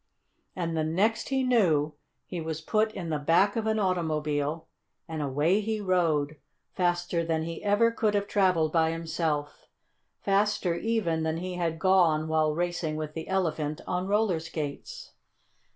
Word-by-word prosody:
And 170 -2 -2
the 160 - +1
next 205 +8 0
he 265 -1 +1
knew 170 - +2 0.3
he 175 -2 -5
was 160 -1 -4
put 215 +6 +1
in 170 -4 -5
the 150 - 0
back 170 +7 +3
of 225 -1 -1
an 220 0 +1
automobile 155 -5 -1 0.4
and 160 -1 -4
away 150 +8 +2
he 215 +1 -2
rode, 165 -6 +1 0.4
faster 175 -1 0
than 160 -1 -1
he 165 0 -6
ever 210 +3 +3
could 215 -2 0
have 200 0 0
traveled 180 -7 +2
by 160 -1 +3
himself 160 -3 -3 0.5
faster 200 -2 +1
even 170 -4 0
than 160 0 -1
he 180 +2 -4
had 170 -2 -1
gone 165 -4 +3
while 155 -1 +1
racing 175 -2 -1
with 155 -1 -4
the 160 0 -6
Elephant 155 -5 -1
on 180 +1 -2
roller 205 -4 +2
skates. 160 - -6
170 Hz, 155 wpm, -28 LUFS, 155-195 Hz, 0.5 s, back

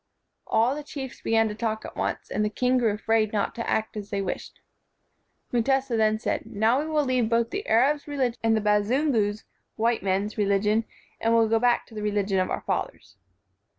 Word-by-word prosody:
All 235 +4 +2
the 300 - -5
chiefs 275 -3 -8
began 225 0 +2
to 210 - -4
talk 220 0 -3
at - - -9
once, - - -3
and 210 - 0
the 210 - +1
king 250 +4 +1
grew 230 -3 +2
afraid 215 +1 +1
not 205 -2 -1
to 230 - -4
act 220 0 -1
as 205 -1 -6
they 200 -2 -2
wished. 195 -2 -5 0.9
Mutesa 265 +1 +1
then 215 -1 +2
said, - - -3
"Now 220 +5 +2
we 305 - -2
will 305 -2 +1
leave 250 -4 +1
both 230 0 +1
the 405 +2 -4
Arab's 280 +7 +2
religion 265 -5 -1
and 225 -1 +3
the - - 0
Bazungu's 210 +1 +1 0.3
[white 230 +1 +1
men's] 195 +3 -1
religion, 210 +2 +2 0.3
and 230 0 +2
will 225 -1 +4
go 225 +1 +2
back 245 0 +2
to - - -18
the 215 - -5
religion 205 -2 0
of 185 - 0
our - - -2
fathers." - - -4
225 Hz, 200 wpm, -26 LUFS, 210-250 Hz, 0.9 s, will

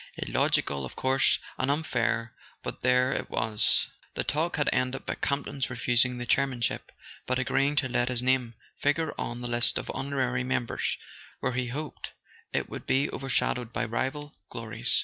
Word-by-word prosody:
Illogical, 70 -1 +1
of 65 - -7
course, 130 0 +3 0.2
and 130 - +1
unfair—but 125 -6 -2
there 125 +1 +4
it - - -3
was. 110 -1 +2 0.3
The - - 0
talk 160 +4 0
had 145 - +1
ended 130 +1 0
by - - -1
Campton's 140 -1 -1
refusing 125 0 +3
the 120 - -4
chair¬ 140 +3 +3
manship, 120 -3 -2 0.4
but 130 - +1
agreeing 135 +3 +2
to 145 -3 +2
let 120 0 +1
his 125 -1 +1
name 125 -2 +2 0.2
figure 150 +2 +1
on 120 +1 -3
the 120 - -3
list 120 -1 +3
of - - -3
honorary 130 -2 0
members, 125 -2 -1 0.4
where 130 - -1
he 125 0 0
hoped 145 +5 -5 0.4
it - - 0
would - - -8
be 135 +3 +2
overshadowed 125 -2 0
by 120 - -1
rival 140 +6 -2 0.2
glories. 115 +1 +3
125 Hz, 165 wpm, -28 LUFS, 120-140 Hz, 0.4 s, there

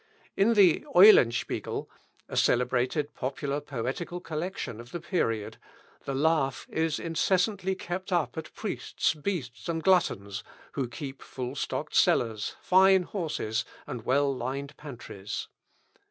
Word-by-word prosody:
In 225 +4 +3
the 190 -6 +5
"Eulenspiegel," 175 - +5 0.4
a - - -7
celebrated 130 +4 +1
popular 140 +2 -3
poetical 140 +7 -4
collection 165 - -4
of 120 - -13
the 175 - -4
period, 115 - -1 0.5
the 135 - -2
laugh 145 -2 +1
is 160 -1 0
incessantly 190 +3 0
kept 185 +1 -5
up 175 -4 +1
at 160 - -6
priests, - - -1
beasts, 150 -5 -4
and 165 -1 -2
gluttons, 100 - +2 0.3
who 135 -3 -2
keep 135 +2 -7
full 125 0 -5
stocked 140 - -3
cellars, 110 -3 +2
fine 190 0 +6
horses, 155 - -2 0.2
and 120 - -6
well 140 +2 +2
lined 135 +3 -4
pantries. 120 -8 -7
150 Hz, 125 wpm, -28 LUFS, 125-175 Hz, 0.5 s, fine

